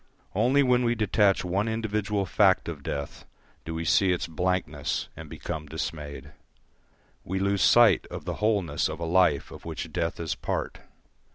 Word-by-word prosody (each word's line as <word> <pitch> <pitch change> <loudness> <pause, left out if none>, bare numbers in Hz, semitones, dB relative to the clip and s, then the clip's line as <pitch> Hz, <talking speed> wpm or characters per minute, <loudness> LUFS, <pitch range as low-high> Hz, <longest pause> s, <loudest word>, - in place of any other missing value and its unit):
Only 140 +3 +3
when 125 -1 +3
we 120 0 +2
detach 105 -3 +2
one 95 +4 0
individual 105 -2 -1
fact 95 0 +3
of 80 -4 -5
death 70 0 -5 0.4
do 80 - -5
we 80 0 -3
see 95 +2 +4
its 90 - -1
blankness 80 -3 -2
and 80 -2 -10
become 80 0 -6
dismayed. 75 -3 -6 0.9
We 95 - -3
lose 100 0 +1
sight 115 -4 +5
of - - -8
the - - -4
wholeness 105 -5 +1
of - - -6
a 85 - -3
life 85 -4 +2
of - - -11
which - - -6
death 80 - -2
is 80 -2 -2
part. - - -4
90 Hz, 165 wpm, -27 LUFS, 80-105 Hz, 0.9 s, sight